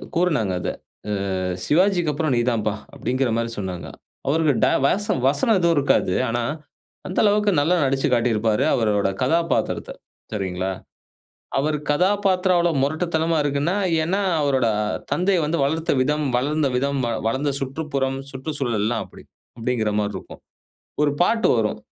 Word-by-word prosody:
கூறுனாங்க 155 Hz, -, +1 dB
அத. -, -, -2 dB, 0.7 s
அ -, -, -2 dB, 0.2 s
"சிவாஜிக்கு 175 Hz, -, +2 dB
அப்புறம் 155 Hz, 0 st, -1 dB
நீ 120 Hz, -, +2 dB
தாம்ப்பா" 110 Hz, -3 st, -1 dB, 0.2 s
அப்படிங்க்கிற 130 Hz, 0 st, -1 dB
மாதிரி 115 Hz, 0 st, -1 dB
சொன்னாங்க. 90 Hz, -3 st, -5 dB, 0.4 s
அவருக்கு 155 Hz, 0 st, +2 dB
டய -, -, +3 dB
வச 205 Hz, +7 st, 0 dB, 0.2 s
வசனம் 150 Hz, +10 st, +2 dB
எதுவும் 170 Hz, -1 st, +3 dB
இருக்காது. 140 Hz, -, +2 dB
ஆனா, 120 Hz, +1 st, -1 dB, 0.7 s
அந்த 185 Hz, -, -4 dB
அளவுக்கு 210 Hz, 0 st, +3 dB
நல்லா 170 Hz, +5 st, +2 dB
நடிச்சுக் 135 Hz, -1 st, 0 dB
காட்டியிருப்பாரு, 115 Hz, -2 st, +1 dB
அவருடைய 105 Hz, -4 st, +1 dB
கதாபாத்திரத்த. 165 Hz, +6 st, 0 dB, 0.4 s
சரிங்களா? 95 Hz, -2 st, -2 dB, 0.9 s
அவரு 150 Hz, +2 st, 0 dB
கதாபத்திரம் 185 Hz, +2 st, +2 dB
அவ்வளோ 170 Hz, -1 st, +2 dB
முரட்டுத்தனமா 160 Hz, +2 st, 0 dB
இருக்குன்னா, 145 Hz, +6 st, 0 dB, 0.3 s
ஏன்னா, 190 Hz, +5 st, 0 dB, 0.2 s
அவருடைய 130 Hz, -6 st, +2 dB, 0.4 s
தந்தை 185 Hz, +1 st, +2 dB
வந்து 160 Hz, +3 st, -1 dB
வளர்த்த 160 Hz, +4 st, 0 dB
விதம், 150 Hz, +3 st, 0 dB
வளர்ந்த 145 Hz, +3 st, +1 dB
விதம், 140 Hz, +2 st, 0 dB
வ 120 Hz, -, -1 dB, 0.2 s
வளர்ந்த 140 Hz, +5 st, 0 dB
சுற்றுப்புறம் 135 Hz, -1 st, -2 dB
சுற்றுச்சூழல்லாம் 130 Hz, -6 st, -2 dB
அப்படி. -, -, -15 dB, 0.3 s
அப்படிங்கிற 115 Hz, -2 st, 0 dB
மாரி 105 Hz, 0 st, -1 dB
இருக்கும். -, -, -9 dB, 0.6 s
ஒரு 150 Hz, -, +3 dB
பாட்டு 225 Hz, +5 st, +2 dB
வரும். 110 Hz, -2 st, 0 dB
140 Hz, 135 wpm, -22 LUFS, 120-165 Hz, 0.9 s, டய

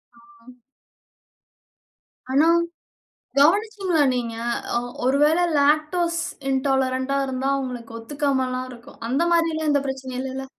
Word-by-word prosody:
ம். 235 Hz, +1 st, -19 dB, 1.7 s
ஆனா, 285 Hz, +4 st, +4 dB, 0.9 s
கவனிச்சீங்களா 380 Hz, +1 st, +3 dB
நீங்க? 235 Hz, -2 st, -3 dB, 0.4 s
ஆ -, -, +4 dB, 0.3 s
ஒரு 265 Hz, +2 st, +3 dB
வேள 315 Hz, +3 st, +3 dB, 0.2 s
லாக்டோஸ் 310 Hz, +4 st, +2 dB, 0.3 s
இன்டாலறன்டா 265 Hz, 0 st, 0 dB
இருந்தா, 265 Hz, +1 st, -2 dB
அவனுக்கு 245 Hz, -3 st, -6 dB
ஒத்துக்காமலாம் 260 Hz, -1 st, -1 dB
இருக்கும். 240 Hz, -1 st, -14 dB
அந்த 270 Hz, +7 st, +1 dB
மாரிலாம் 325 Hz, -2 st, +1 dB
எந்த 285 Hz, -1 st, +3 dB
பிரச்சனையும் 260 Hz, -1 st, -4 dB
இல்லல. 265 Hz, 0 st, -5 dB
270 Hz, 100 wpm, -23 LUFS, 255-305 Hz, 1.7 s, ஆனா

